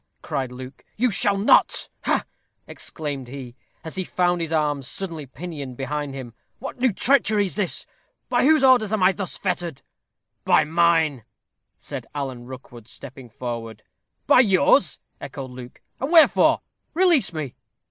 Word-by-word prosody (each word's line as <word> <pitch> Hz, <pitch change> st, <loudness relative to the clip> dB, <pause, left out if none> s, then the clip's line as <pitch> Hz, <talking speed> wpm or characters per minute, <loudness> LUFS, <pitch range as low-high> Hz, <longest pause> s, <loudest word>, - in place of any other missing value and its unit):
cried 130 Hz, -2 st, -3 dB
Luke; 130 Hz, +1 st, -10 dB
"you 245 Hz, +2 st, +2 dB
shall 200 Hz, -1 st, +2 dB
not. 200 Hz, -, +3 dB, 0.2 s
Ha!" -, -, +1 dB, 0.4 s
exclaimed 145 Hz, -5 st, -5 dB
he, 125 Hz, -2 st, -9 dB, 0.3 s
as 160 Hz, -, -7 dB
he 190 Hz, -, -2 dB
found 175 Hz, -1 st, 0 dB
his 165 Hz, -1 st, -3 dB
arms 145 Hz, -4 st, 0 dB
suddenly 165 Hz, -7 st, -5 dB
pinioned 140 Hz, -3 st, -8 dB
behind 145 Hz, 0 st, -4 dB
him. 125 Hz, -4 st, -8 dB, 0.2 s
"What 270 Hz, -1 st, -8 dB
new 255 Hz, -1 st, +3 dB
treachery 215 Hz, -2 st, +2 dB
is 185 Hz, -, -3 dB
this? 195 Hz, -4 st, -1 dB, 0.4 s
By 245 Hz, -1 st, +1 dB
whose 310 Hz, +1 st, +4 dB
orders 250 Hz, -6 st, +5 dB
am 215 Hz, -4 st, +1 dB
I 185 Hz, -, +6 dB
thus 195 Hz, -2 st, -5 dB
fettered?" 175 Hz, -6 st, -3 dB, 0.6 s
"By -, -, +4 dB
mine," 160 Hz, -5 st, +2 dB, 0.5 s
said -, -, -6 dB
Alan 130 Hz, -4 st, -5 dB
Rookwood, 125 Hz, -3 st, -11 dB
stepping 130 Hz, -1 st, -10 dB
forward. 115 Hz, -2 st, -6 dB, 0.4 s
"By 280 Hz, -, +6 dB
yours?" 195 Hz, -, +4 dB, 0.2 s
echoed 135 Hz, -2 st, -7 dB
Luke. 125 Hz, -1 st, -11 dB, 0.2 s
"And 270 Hz, +4 st, -3 dB
wherefore? 330 Hz, -2 st, +5 dB, 0.3 s
Release 345 Hz, -, +6 dB
me." 155 Hz, -6 st, -5 dB
160 Hz, 145 wpm, -23 LUFS, 130-200 Hz, 0.6 s, I